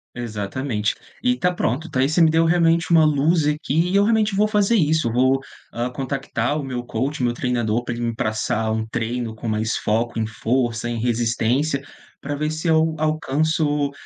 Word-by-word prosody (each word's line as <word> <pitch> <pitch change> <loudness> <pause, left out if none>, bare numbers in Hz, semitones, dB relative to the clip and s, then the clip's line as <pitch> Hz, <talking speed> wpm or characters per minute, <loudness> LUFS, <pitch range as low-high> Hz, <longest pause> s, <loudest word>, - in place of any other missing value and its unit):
Exatamente. 110 0 -2 0.3
E, 250 0 +3
tá 180 0 +1
pronto, 160 +1 -2
tá, 130 -4 +1
e 135 - +2
você 160 - +1
me 160 -2 +6
deu 165 +1 +3
realmente 165 0 +2
uma 165 -2 +6
luz 150 +2 +2
aqui. 150 +3 0
E 195 - 0
eu 200 - +5
realmente 215 -2 +2
vou 210 +1 +3
fazer 210 +1 +2
isso. 160 - +2
Eu 115 - -2
vou, 130 +2 +3 0.3
ah, 120 +1 -2
contactar 135 +1 -2
o - - -4
meu 125 -2 -4
coach, 130 +5 -3
meu 120 -1 +2
treinador, 120 -2 -1
pra 120 - -4
ele 120 - -4
me 115 -1 -2
passar 110 0 -1
um 110 0 -2
treino 115 0 -3
com 115 +1 -7
mais 110 +1 -1
foco 115 +2 -1
em 110 - 0
força, 120 +2 -1
em 115 -1 -3
resistência 120 +4 0 0.4
pra 145 +1 -3
ver 150 +1 -2
se 160 +2 -4
eu 160 0 +3
alcanço, 155 -1 0
135 Hz, 195 wpm, -22 LUFS, 115-160 Hz, 0.4 s, me